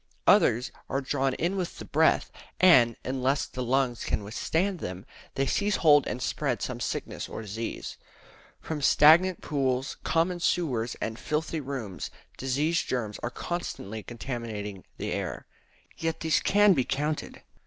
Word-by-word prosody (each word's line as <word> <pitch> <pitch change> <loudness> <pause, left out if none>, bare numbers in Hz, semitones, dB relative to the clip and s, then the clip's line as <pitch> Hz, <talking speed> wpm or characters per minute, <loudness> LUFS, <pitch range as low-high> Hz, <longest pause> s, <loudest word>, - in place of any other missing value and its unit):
Others 120 +3 +4 0.2
are 135 - 0
drawn 135 -1 0
in 175 +4 -1
with 185 -3 -3
the - - -8
breath; - - +2 0.3
and, 125 -11 +6
unless 130 +2 0
the 130 - -6
lungs 125 -1 +1
can - - -1
withstand 165 - -1
them, 90 -1 -6 0.3
they 135 - +1
seize 205 +7 +1
hold 145 -3 +5
and 125 - -3
spread - - -1
some - - -4
sickness - - -4
or 110 - -6
disease. 110 +2 -5 0.6
From 155 -2 -5
stagnant 165 +6 +6
pools, 135 -3 -1
common 175 +2 +1
sewers, 130 -10 0
and 110 0 -3
filthy 155 +1 -2
rooms, 130 -9 -5 0.3
disease 145 +6 0
germs 110 -5 -3
are 120 - -3
constantly 115 - -5
contaminating 115 -5 -6
the - - -3
air. - - -4 0.5
Yet 165 0 -3
these 160 -1 +3
can 205 0 +5
be 135 -6 +2
counted. 150 +4 -3
135 Hz, 145 wpm, -28 LUFS, 120-160 Hz, 0.6 s, and